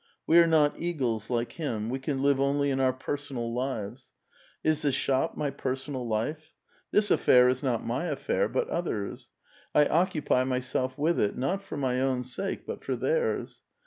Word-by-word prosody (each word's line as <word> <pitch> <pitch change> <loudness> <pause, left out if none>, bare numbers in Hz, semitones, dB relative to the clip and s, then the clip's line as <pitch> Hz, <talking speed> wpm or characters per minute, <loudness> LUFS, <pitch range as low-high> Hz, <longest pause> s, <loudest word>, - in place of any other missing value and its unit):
We 165 +2 +6
are 170 - +6
not 155 -3 +3
eagles, 125 -11 -2
like 120 -1 -1
him; 115 -10 -3
we 130 - -2
can 135 0 -2
live 140 -1 +3
only 140 +1 +2
in 135 - 0
our 130 -1 +3
personal 130 -2 -4
lives. 125 -1 -4 0.5
Is 155 -1 +2
the 145 - +2
shop 130 0 0
my 145 -2 -1
personal 130 -1 -4
life? 150 +9 -3 0.3
This 210 -1 +2
affair 125 0 +6
is 130 0 +1
not 125 -5 -1
my 125 +8 -1
affair, 170 - 0
but - - 0
others'. 110 - -3 0.5
I 150 - +6
occupy 155 -6 +2
myself 130 0 -1
with 160 +4 +1
it, 105 - 0
not 180 +10 -1
for 195 - -7
my 130 -2 0
own 130 -2 0
sake, 130 +11 -3
but - - -6
for - - -2
thcii*s. 480 0 -1
135 Hz, 175 wpm, -28 LUFS, 125-155 Hz, 0.5 s, We